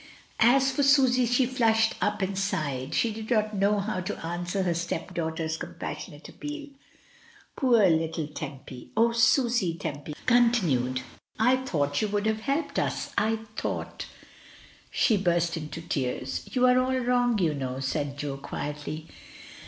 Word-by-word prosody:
As 265 +4 +5
for 270 - 0
Susy, 260 -3 +4
she 245 +2 +3
flushed 225 -3 +2
up 210 -1 0
and 190 +1 -2
sighed, 145 -9 -2
she 230 -2 +2
did 220 0 -7
not 215 -3 +1
know 200 +1 +2
how 200 -1 -2
to 185 - -4
answer 175 +3 -2
her 175 -2 +1
stepdaughter's 165 -1 -3
pas - - -7 0.3
sionate - - -10
appeal. 295 0 -7 0.9
Poor 235 -7 +4
little 160 -1 +1
Tempy! 140 -4 -8
"O 230 +1 +5
Susy," 230 - +3
Tempy 150 -2 -5
continued, 180 - +3 0.3
"I 250 +4 +4
thought 145 - -1
you 215 - +1
would 205 0 -1
have 220 0 +1
helped 280 +6 -1
us - - -2
— - - -24
I 220 +1 0
thought" - - -4 0.4
— - - -23
she 220 - +3
burst 175 -3 +1
into 160 0 -6
tears. 130 -4 -3
"You 255 -1 +3
are 250 0 +5
all 260 +1 +1
wrong, 245 -2 +2
you 170 -6 +2
know," 130 -2 -4
said 140 +1 -2
Jo 140 -1 -4
quietly. 150 +2 -5
195 Hz, 155 wpm, -27 LUFS, 155-240 Hz, 0.9 s, As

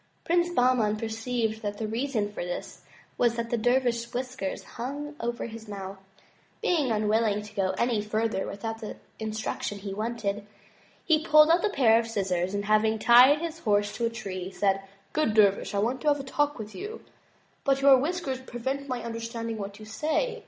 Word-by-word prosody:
Prince 345 +1 +2
Bahman 245 -8 +2
perceived 225 0 -2
that 205 -1 -3
the 220 - -3
reason 225 -2 -1
for - - -4
this 175 0 -6 0.4
was 235 -1 +3
that 235 0 -3
the - - +3
dervish's 240 0 +1
whiskers 250 -5 -4
hung 285 +5 -6
over 235 0 -3
his 225 -1 -9
mouth. 195 -1 -7 0.6
Being 305 -7 +1
unwilling 215 -1 +1
to 210 0 -12
go 190 -2 0
any 235 -3 +1
further 215 -1 -1
without 225 +2 -5
the 215 - -6 0.2
instruction 215 -1 -3
he 200 0 -6
wanted, 210 -1 -3 0.6
he 315 -2 +3
pulled 305 0 +6
out 340 +1 +4
a 425 - +3
pair 230 - +4
of 230 - -3
scissors, 190 -3 -1
and 205 0 -2
having 215 +1 +3
tied 250 +7 +7
his 335 -1 -4
horse 205 -5 +1
to 235 - +1
a - - -1
tree, 195 -5 -5
said: 195 0 +1 0.3
"Good 305 -9 +1
dervish, 200 -1 +3
I - - +1
want 235 +5 0
to - - -3
have 290 -1 +4
a - - -5
talk 290 +2 0
with 215 -2 -7
you, 420 +4 -7 0.6
but 275 0 +2
your 275 -2 +8
whiskers 290 -3 -2
pre 240 -2 -8
vent 275 +3 -2
my 250 -3 -3
understanding 230 -1 -4
what 200 0 -6
you 215 - -11
say. 315 - -1
230 Hz, 190 wpm, -27 LUFS, 210-265 Hz, 0.6 s, your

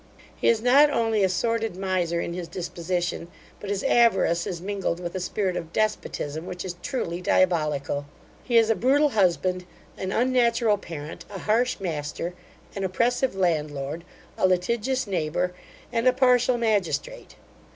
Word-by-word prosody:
He - - -1
is 230 -1 +3
not 275 +4 +6
only 225 -6 +1
a 190 - +3
sordid 225 +2 -1
miser 185 -3 0
in 170 - -3
his 175 -1 -5
disposition, 175 0 -3 0.3
but 205 - -7
his 200 -1 -1
avarice 235 -10 +3
is 175 - -4
mingled 190 -2 -2
with 175 -1 -5
a 190 - -3
spirit 185 0 -1
of 165 -2 -5
despotism, 170 -7 -2
which 180 +1 -6
is 180 -1 -4
truly 180 -10 -3
diabolical. 150 -6 +1 0.4
He 240 -2 +2
is 225 -1 +5
a - - +2
brutal 285 +6 +3
husband, 185 -4 +1 0.4
an 190 0 -3
unnatural 235 -3 +2
parent, 155 -4 -8
a 200 - -7
harsh 230 +5 +1
master, 165 -1 -4 0.4
an 195 - -3
oppressive 240 +5 +1
landlord, 155 -4 -1 0.4
a - - +4
litigious 235 +8 0
neighbour, 180 -2 -1 0.4
and 230 +1 +1
a 255 - +6
partial 250 -1 +3
magistrate. 225 - -1
190 Hz, 150 wpm, -25 LUFS, 170-235 Hz, 0.4 s, not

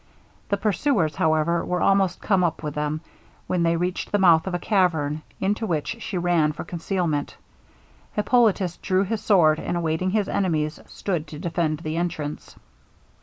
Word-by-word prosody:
The 200 - +1
pursuers, 200 - +1
however, 160 +2 +2
were 180 0 -1
almost 195 -2 +2
come 195 -3 +2
up 165 -2 -1
with 150 -1 -3
them, 150 +1 -2 0.4
when 180 - 0
they 170 0 +2
reached 180 +2 -2
the 205 - +3
mouth 175 -3 +5
of 185 - -1
a - - +1
cavern, 165 -7 +1 0.2
into 205 +3 0
which 165 +6 -2
she 195 - -4
ran 170 -3 +2
for - - -6
concealment. 170 -4 -2 0.8
Hippolitus 210 -5 +2
drew 185 +1 +1
his 210 +1 -2
sword; 160 -7 +4
and 175 - -2
awaiting 165 +2 0
his 205 0 +1
enemies, 155 -5 -1
stood 170 -6 -3
to 150 - -9
defend 160 -1 -1
the 155 0 -3
entrance. 155 -4 -4
175 Hz, 165 wpm, -24 LUFS, 155-195 Hz, 0.8 s, mouth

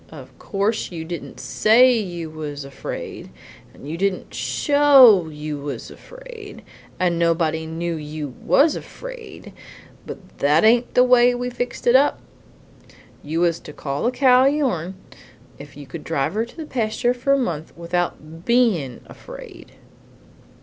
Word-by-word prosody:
Of - - -13
course 205 +1 -2
you 165 -2 -6
didn't 170 0 -7
SAY 245 +4 +4
you 175 -7 -4
was 145 -2 -6
afraid, 140 - -7 0.4
and - - -15
didn't 195 -1 -2
SHOW 270 - +5
you 150 -1 -6
was 140 -4 -6
afraid, - - -12 0.4
and 175 -2 +1
nobody 160 -1 0
knew 170 +1 -3
you 150 -1 -6
WAS 295 +2 +4
afraid, - - -10 0.5
but 185 -3 -11
that 150 +3 +3
ain't 235 +2 +3
the 250 - +6
way 245 -1 +5
we 245 0 -3
fixed 245 0 -5
it 240 - +4
up. 280 +2 +4 1.0
You 160 +3 -3
was 170 -1 +1
to 150 - -11
call 140 +3 -4
the 245 - +2
cow 255 -1 +4
your'n 250 - 0 0.6
if 140 0 -12
you 145 - -9
could 150 +4 -9
drive 140 -2 -1
her 220 +2 -1
to 240 - -18
the 320 - -6
pasture 240 -1 -1
for 250 +3 0
a - - +3
month 165 - -3
without 170 -2 -4
BEIN' 210 - +1
afraid. - - -12
185 Hz, 145 wpm, -21 LUFS, 160-250 Hz, 1.0 s, the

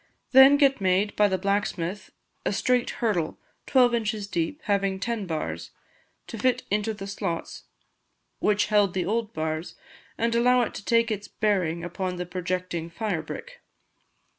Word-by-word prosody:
Then 270 +2 +8
get 275 -5 +3
made 190 +2 +2
by 210 - +4
the 190 -1 0
blacksmith 195 -1 -2 0.3
a - - 0
straight 245 +4 +1 0.2
hurdle, 175 -8 0 0.3
twelve 250 -3 +4
inches 215 -3 -1
deep, 315 +6 -3
having 195 -2 0
ten 225 -2 -3
bars, 85 - -4 0.6
to 225 - -8
fit 255 +1 +1
into 210 +1 0
the 195 -1 -7
slots 195 -4 -4 0.7
which 205 -1 +2
held 205 -3 +2
the 180 -2 0
old 220 +2 -1
bars, 155 -1 -3 0.4
and 230 0 0
allow 245 +1 +4
it - - -4
to - - -7
take 230 +1 +2
its 205 -1 -3
bearing 180 -6 0
upon 180 +1 -3
the 180 0 -4
projecting 180 -1 -3
fire 175 -1 -2
brick. - - -9
205 Hz, 155 wpm, -26 LUFS, 180-230 Hz, 0.7 s, Then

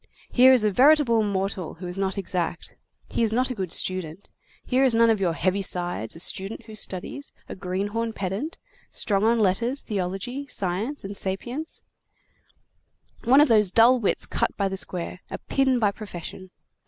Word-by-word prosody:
Here 255 +1 +7
is 255 -4 +4
a 210 - +2
veritable 260 -1 +5
mortal 195 -4 -2
who 180 +3 -9
is 180 0 -4
not 195 0 -1
exact. 180 -3 -3 0.3
He's 225 -2 0
not 255 +3 +1
a - - -1
good 190 -7 -4
student. 185 0 -3 0.3
Here 260 +1 +2
is 255 -4 +3
none 230 0 +5
of 215 -3 0
your 175 -3 +1
heavy 190 +4 0
sides, 175 - -1
a - - -10
student 195 +4 -1
who 220 - -11
studies, 215 +7 -4 0.2
a - - -7
greenhorn 200 +5 -2
pedant, 205 - -4 0.3
strong 200 -2 +1
on 230 +2 +3
letters, 230 +7 +1
theology, 205 +7 -4
science, 205 +7 -2
and 200 +1 -6
sapience, 240 +12 -4 1.4
one 265 +5 +6
of 300 - +5
those 215 -5 +5
dull 235 +6 +5
wits 210 - +1
cut - - -2
by 200 - +1
the 190 - -3
square; 185 -1 -3
a - - -5
pin 265 -2 +1
by 210 -4 +2
profession. 190 -2 -9
205 Hz, 170 wpm, -25 LUFS, 185-240 Hz, 1.4 s, Here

